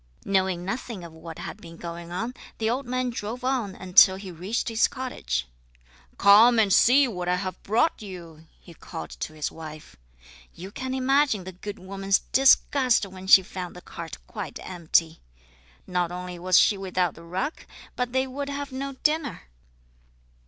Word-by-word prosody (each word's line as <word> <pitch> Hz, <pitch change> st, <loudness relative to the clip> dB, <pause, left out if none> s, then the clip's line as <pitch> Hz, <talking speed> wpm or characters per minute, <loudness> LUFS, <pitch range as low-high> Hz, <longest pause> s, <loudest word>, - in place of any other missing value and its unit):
Knowing 190 Hz, -2 st, +1 dB
nothing 215 Hz, -1 st, -5 dB
of 170 Hz, -1 st, -10 dB
what 160 Hz, 0 st, -10 dB
had -, -, -7 dB
been 165 Hz, -1 st, -11 dB
going 170 Hz, 0 st, -7 dB
on, 225 Hz, +8 st, -3 dB, 0.2 s
the 220 Hz, -, -1 dB
old 250 Hz, +3 st, -1 dB
man 255 Hz, 0 st, -1 dB
drove 235 Hz, +2 st, -5 dB
on 250 Hz, -7 st, -1 dB
until 185 Hz, 0 st, +6 dB
he 190 Hz, -1 st, -8 dB
reached 185 Hz, +7 st, -3 dB
his 225 Hz, -1 st, +3 dB
cottage. 65 Hz, -, -3 dB, 0.7 s
"Come 220 Hz, +4 st, +7 dB
and 205 Hz, -4 st, +4 dB
see 265 Hz, +3 st, +6 dB
what 180 Hz, -6 st, -5 dB
I 180 Hz, -, +3 dB
have 185 Hz, 0 st, -5 dB
brought 230 Hz, +10 st, +1 dB
you!" 170 Hz, -5 st, -10 dB
he 170 Hz, -, -15 dB
called 80 Hz, -, -8 dB
to 155 Hz, -, -6 dB
his 155 Hz, -1 st, -3 dB
wife. 155 Hz, -1 st, -10 dB, 0.6 s
You 185 Hz, +3 st, -9 dB
can 260 Hz, +4 st, -4 dB
imagine 265 Hz, -5 st, +2 dB
the 185 Hz, -, -7 dB
good 200 Hz, +3 st, -8 dB
woman's 195 Hz, +1 st, 0 dB
disgust 265 Hz, -3 st, +4 dB
when 190 Hz, -1 st, -10 dB
she 190 Hz, 0 st, +8 dB
found 180 Hz, -1 st, -7 dB
the 180 Hz, -, -10 dB
cart 165 Hz, -4 st, -8 dB
quite 210 Hz, -4 st, -6 dB
empty. 165 Hz, -2 st, 0 dB, 0.7 s
Not 180 Hz, -1 st, -1 dB
only 180 Hz, 0 st, -6 dB
was 180 Hz, 0 st, +3 dB
she 205 Hz, -3 st, +3 dB
without 180 Hz, -3 st, 0 dB
the 165 Hz, -, -14 dB
rug, 185 Hz, -, -2 dB, 0.4 s
but 250 Hz, -1 st, -2 dB
they 260 Hz, +1 st, +1 dB
would 280 Hz, +2 st, -5 dB
have 285 Hz, 0 st, -4 dB
no 275 Hz, +1 st, -4 dB
dinner. 300 Hz, -, -1 dB
195 Hz, 170 wpm, -26 LUFS, 175-250 Hz, 0.7 s, she